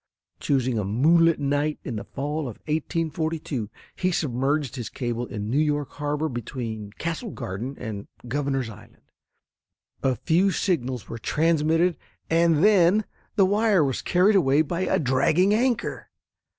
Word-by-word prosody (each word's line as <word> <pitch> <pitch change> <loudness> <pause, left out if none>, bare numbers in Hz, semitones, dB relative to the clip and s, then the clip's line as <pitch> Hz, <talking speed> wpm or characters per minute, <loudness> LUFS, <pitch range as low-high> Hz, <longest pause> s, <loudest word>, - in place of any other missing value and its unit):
Choosing 130 -4 +1
a - - -1
moonlight 160 - +4
night 145 +1 0
in 120 -5 -4
the - - -5
fall 140 +9 -4
of 110 - -8
1842, 155 - -2 0.3
he 185 0 0
submerged 140 -2 0
his 120 -4 -5
cable 120 -1 -3
in 105 -1 -5
New 130 +6 +1
York 150 -2 0
Harbor 145 +1 -2
between 115 -4 -5
Castle 170 +8 -3
Garden 120 - -5
and 110 -4 -6 0.2
Governors 135 -1 -1
Island. 110 -2 -14 1.0
A 130 -1 +1
few 175 +9 +2
signals 130 - -1
were 115 - -6
transmitted 165 - +2 0.3
and 165 -1 +4
then 205 0 +5 0.3
the 195 - +5
wire 205 -2 +3
was 135 -3 -1
carried 190 +4 +3
away 145 -4 +4
by 170 +3 -3
a - - +2
dragging 155 +8 +3
anchor. 240 +1 0
145 Hz, 140 wpm, -25 LUFS, 125-170 Hz, 1.0 s, then